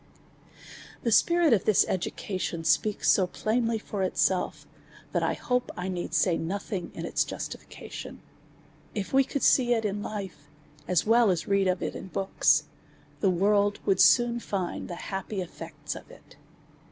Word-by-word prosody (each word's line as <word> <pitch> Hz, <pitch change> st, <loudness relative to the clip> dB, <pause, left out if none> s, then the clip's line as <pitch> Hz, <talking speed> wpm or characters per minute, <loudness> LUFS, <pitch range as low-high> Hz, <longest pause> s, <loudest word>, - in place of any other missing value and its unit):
The 230 Hz, -, +1 dB
spirit 340 Hz, +5 st, +4 dB
of 205 Hz, -3 st, +2 dB
this 215 Hz, -, +4 dB
education 185 Hz, -2 st, -3 dB
speaks 210 Hz, +5 st, +1 dB
so 185 Hz, -2 st, +4 dB
plainly 230 Hz, +4 st, 0 dB
for 210 Hz, -2 st, -5 dB
it 185 Hz, -, -1 dB
self, 185 Hz, -1 st, +1 dB, 0.5 s
thatj -, -, +1 dB
I -, -, 0 dB
hope^ 250 Hz, 0 st, -1 dB
1 185 Hz, +1 st, -3 dB
need 175 Hz, -1 st, -4 dB
say 175 Hz, -4 st, +3 dB
nothing 190 Hz, +1 st, -4 dB
in -, -, -5 dB
its -, -, +1 dB
justifica -, -, -8 dB
tion. -, -, -7 dB, 0.8 s
If 205 Hz, +2 st, -4 dB
we 270 Hz, 0 st, +6 dB
could 280 Hz, +1 st, -4 dB
see 245 Hz, -2 st, +4 dB
it 225 Hz, -1 st, -2 dB
in 205 Hz, 0 st, -2 dB
life^ 195 Hz, -8 st, -6 dB, 0.4 s
as 180 Hz, -3 st, +2 dB
well 230 Hz, 0 st, +5 dB
as 180 Hz, -3 st, 0 dB
read 195 Hz, -1 st, +2 dB
of 185 Hz, 0 st, 0 dB
it -, -, -3 dB
in 190 Hz, -, -8 dB
books^ 195 Hz, +1 st, +2 dB, 0.6 s
the 195 Hz, -, +3 dB
world 205 Hz, +3 st, +2 dB
would 195 Hz, -2 st, +3 dB
soon 240 Hz, -1 st, +5 dB
find 190 Hz, -6 st, -3 dB
the 175 Hz, -, -6 dB
happy 195 Hz, +3 st, -5 dB
eftects 180 Hz, -3 st, -6 dB
of -, -, -11 dB
it. -, -, -17 dB
200 Hz, 165 wpm, -27 LUFS, 185-225 Hz, 0.8 s, we